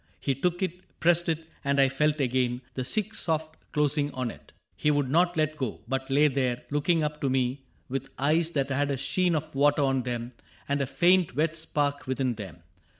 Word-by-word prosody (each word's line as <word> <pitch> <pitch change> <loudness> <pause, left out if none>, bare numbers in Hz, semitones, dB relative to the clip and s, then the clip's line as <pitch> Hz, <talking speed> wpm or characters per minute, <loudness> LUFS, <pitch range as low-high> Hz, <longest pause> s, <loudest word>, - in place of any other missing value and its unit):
He 140 - 0
took 175 +7 -1
it, 180 -1 -2 0.2
pressed 175 0 +3
it; 160 0 -1 0.2
and 140 0 +1
I 135 - +6
felt 150 +3 +1
again 125 -2 +1
The 130 - -3
sick 215 - 0
soft 160 -5 -1 0.2
closing 150 0 +1
on 125 -3 -2
it. - - -16 0.2
He 150 - +1
would 145 -3 +1
not 175 +2 +3
Let 155 0 +1
go, 130 -7 -3
but 135 +1 -2
lay 145 +3 +5
there, 130 -3 -1
looking 155 +3 +2
up 150 0 -3
to 135 - +1
me 130 +1 0 0.3
With 135 +1 -4
eyes 155 +4 +2
that 140 -2 0
had 140 +2 +1
a 140 - 0
sheen 175 +6 +1
of 150 - -3
water 145 +1 +3
on 135 -1 +2
them 120 -1 -4 0.4
And 140 0 0
a 135 - 0
faint 175 0 +3
wet 155 +2 +1
spark 145 -4 -2
within 130 -1 0
them. 95 -7 -9
145 Hz, 205 wpm, -27 LUFS, 130-155 Hz, 0.4 s, I